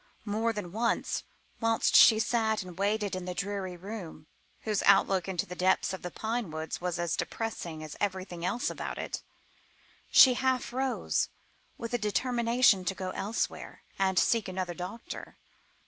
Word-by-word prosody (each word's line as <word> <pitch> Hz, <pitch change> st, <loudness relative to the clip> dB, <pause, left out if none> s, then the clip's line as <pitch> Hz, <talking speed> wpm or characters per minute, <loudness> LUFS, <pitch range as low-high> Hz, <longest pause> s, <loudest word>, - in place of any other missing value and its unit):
More 220 Hz, +2 st, 0 dB
than 205 Hz, -6 st, -5 dB
once, 230 Hz, +4 st, -1 dB, 0.3 s
whilst 225 Hz, -1 st, +2 dB
she 220 Hz, -, +9 dB
sat 220 Hz, -2 st, +1 dB
and 180 Hz, -2 st, -10 dB
waited 205 Hz, 0 st, 0 dB
in 185 Hz, -1 st, -5 dB
the 180 Hz, 0 st, -4 dB
dreary 195 Hz, -2 st, -3 dB
room, 180 Hz, -5 st, -8 dB, 0.4 s
whose 210 Hz, -3 st, 0 dB
outlook 195 Hz, -2 st, +4 dB
into 185 Hz, -3 st, -1 dB
the 180 Hz, -, -8 dB
depths 185 Hz, +1 st, +2 dB
of 190 Hz, -, -6 dB
the 180 Hz, -, -4 dB
pine 225 Hz, +1 st, -3 dB
woods 160 Hz, +2 st, -5 dB
was 180 Hz, -1 st, -2 dB
as 170 Hz, -1 st, 0 dB
depressing 175 Hz, -8 st, -4 dB
as 155 Hz, -, -8 dB
everything 185 Hz, -3 st, -3 dB
else 240 Hz, +7 st, 0 dB
about -, -, -5 dB
it, -, -, -4 dB, 0.9 s
she 260 Hz, -, +8 dB
half 260 Hz, -1 st, 0 dB
rose, 260 Hz, 0 st, 0 dB, 0.5 s
with 230 Hz, +1 st, -6 dB
a 245 Hz, -, +1 dB
determination 235 Hz, -1 st, +3 dB
to 195 Hz, -, -1 dB
go 185 Hz, -1 st, -4 dB
elsewhere 210 Hz, +5 st, -3 dB, 0.2 s
and 190 Hz, -1 st, +2 dB
seek 225 Hz, +4 st, +3 dB
another 185 Hz, -1 st, -3 dB
doctor. 185 Hz, +6 st, -7 dB
200 Hz, 160 wpm, -30 LUFS, 180-225 Hz, 0.9 s, she